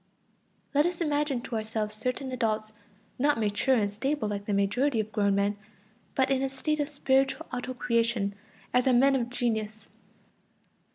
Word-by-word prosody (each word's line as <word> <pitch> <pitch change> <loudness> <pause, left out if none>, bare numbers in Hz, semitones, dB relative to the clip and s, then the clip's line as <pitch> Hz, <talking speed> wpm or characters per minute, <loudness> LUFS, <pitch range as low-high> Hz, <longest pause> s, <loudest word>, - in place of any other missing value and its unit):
Let 295 +3 +4
us 355 -1 -4
imagine 295 -5 0
to 245 - -5
ourselves 215 -1 -2
certain 255 +4 -3
adults, 220 -3 -1 0.5
not 290 +1 +3
mature 215 +5 +2
and 205 -4 +1
stable 265 +3 -1
like 200 -1 -4
the - - -1
majority 220 +6 +2
of 215 0 -2
grown 200 -2 +2
men, 200 +1 +1 0.6
but 265 0 +2
in 265 -1 +2
a 270 - 0
state 305 +3 -2
of 290 0 0
spiritual 270 -2 +1
auto 250 +1 -3
creation, 230 -4 +1 0.4
as 250 +1 +3
are 260 - +5
men 270 +3 +5
of 240 -2 -1
genius. 220 -3 -2
245 Hz, 165 wpm, -28 LUFS, 215-270 Hz, 0.6 s, are